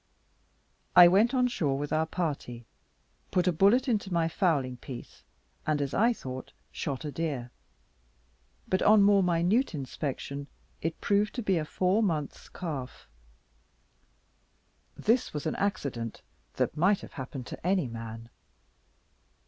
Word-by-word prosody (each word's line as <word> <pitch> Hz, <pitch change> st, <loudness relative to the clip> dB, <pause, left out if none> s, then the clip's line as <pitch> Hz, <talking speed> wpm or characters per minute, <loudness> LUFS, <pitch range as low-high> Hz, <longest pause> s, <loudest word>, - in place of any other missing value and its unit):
I 175 Hz, -1 st, +11 dB
went 200 Hz, +7 st, +4 dB
on 250 Hz, -1 st, +3 dB
shore 150 Hz, -, 0 dB
with 145 Hz, +2 st, -3 dB
our 160 Hz, +1 st, +1 dB
party, 140 Hz, -9 st, -4 dB, 0.6 s
put 180 Hz, -2 st, +1 dB
a -, -, +5 dB
bullet 210 Hz, -, +4 dB
into 210 Hz, -5 st, 0 dB
my 170 Hz, -2 st, +2 dB
fowling 150 Hz, -8 st, 0 dB
piece, 125 Hz, -1 st, -10 dB, 0.4 s
and, 155 Hz, -1 st, +2 dB
as 140 Hz, -1 st, -2 dB
I 230 Hz, +4 st, +4 dB
thought, 130 Hz, -, -7 dB, 0.2 s
shot 140 Hz, +1 st, -4 dB
a 150 Hz, -, -3 dB
deer; 140 Hz, -7 st, -3 dB, 1.2 s
but 185 Hz, -, +1 dB
on 210 Hz, -1 st, +6 dB
more 200 Hz, 0 st, +5 dB
minute 180 Hz, -, +2 dB
inspection, 140 Hz, 0 st, -4 dB, 0.3 s
it 165 Hz, 0 st, -3 dB
proved 205 Hz, +1 st, +1 dB
to 245 Hz, -, -3 dB
be 190 Hz, -4 st, +2 dB
a 155 Hz, -, -3 dB
four 185 Hz, +7 st, +1 dB
months' 160 Hz, -9 st, -2 dB
calf. 145 Hz, -8 st, -6 dB, 1.9 s
This 235 Hz, -5 st, +1 dB
was 150 Hz, -, -3 dB
an 155 Hz, -, -1 dB
accident 140 Hz, -, -3 dB, 0.3 s
that -, -, 0 dB
might 185 Hz, +6 st, +3 dB
have -, -, -11 dB
happened 130 Hz, -2 st, -6 dB
to -, -, -9 dB
any 185 Hz, -6 st, +2 dB
man. 115 Hz, 0 st, -8 dB
165 Hz, 140 wpm, -29 LUFS, 135-195 Hz, 1.9 s, I